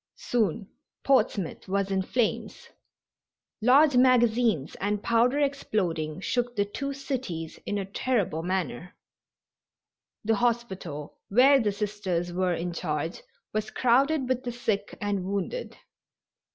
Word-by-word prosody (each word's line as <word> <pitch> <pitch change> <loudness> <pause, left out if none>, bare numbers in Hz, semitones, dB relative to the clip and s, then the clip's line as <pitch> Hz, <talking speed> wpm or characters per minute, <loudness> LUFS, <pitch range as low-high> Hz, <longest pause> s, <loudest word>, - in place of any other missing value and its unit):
Soon 225 -3 -1 0.4
Portsmouth 220 -9 +1
was 195 +1 0
in 190 0 +1
flames. 230 +4 -2 0.9
Large 270 +4 +5
magazines 240 - +3
and 205 +1 -1
powder 240 +4 +3
exploding 185 - -1
shook 245 +2 -1
the 205 -1 +2
two 275 +7 -4
cities 255 - -5
in 205 - -1
a 195 - -2
terrible 200 -5 -1
manner. 180 -2 -3 1.3
The 225 0 +2
hospital 195 -11 -2
where 265 +6 +6
the 215 -4 +1
Sisters 195 -4 -2
were 180 -1 +1
in 175 +1 -3
charge 160 -1 -3 0.3
was 215 0 -1
crowded 265 +3 +2
with 255 -1 0
the 245 - -3
sick 225 -4 -2
and 205 -2 -1
wounded. 200 - -3
210 Hz, 120 wpm, -27 LUFS, 185-245 Hz, 1.3 s, where